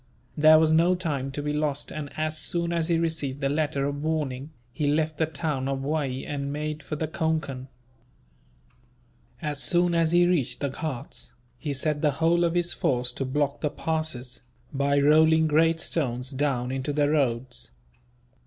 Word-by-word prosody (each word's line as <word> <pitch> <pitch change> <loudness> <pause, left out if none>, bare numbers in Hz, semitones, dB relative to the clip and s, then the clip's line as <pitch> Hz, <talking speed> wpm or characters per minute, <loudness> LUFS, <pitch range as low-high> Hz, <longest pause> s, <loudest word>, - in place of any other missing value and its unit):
There 155 +1 +7
was 160 0 +4
no 170 +3 +4
time 145 -7 -2
to 145 +2 -5
be 150 0 -1
lost 150 -1 -1
and, 150 -2 -5
as 155 0 -1
soon 170 +2 -2
as 165 -1 0
he 170 -1 +2
received 155 -5 -1
the 135 -1 0
letter 145 -2 0
of 145 0 -3
warning, 150 -3 -2 0.2
he 150 0 -1
left 155 +1 0
the 160 - +2
town 150 -4 -2
of 135 0 -2
Waee 140 -3 -2
and 140 -1 -3
made 150 +1 -3
for 150 - -5
the 155 +1 -2
Concan. 155 -5 -2 1.8
As 150 -2 -2
soon 175 -1 +2
as 165 -1 +2
he 175 0 +5
reached 175 -8 0
the 140 - -1
Ghauts, 135 -2 -5 0.3
he 150 - -3
set 150 +2 0
the 150 -2 +2
whole 165 +3 +2
of 170 0 +1
his 175 0 +1
force 125 -1 0
to 135 +2 -4
block 145 +1 -1
the 150 - +1
passes, 155 -6 -3 0.3
by 140 +1 +2
rolling 160 +2 +5
great 165 +2 +3
stones 130 -6 -2
down 130 -3 -1
into 135 +2 -2
the 145 0 +2
roads. 125 -4 0
150 Hz, 175 wpm, -26 LUFS, 140-160 Hz, 1.8 s, There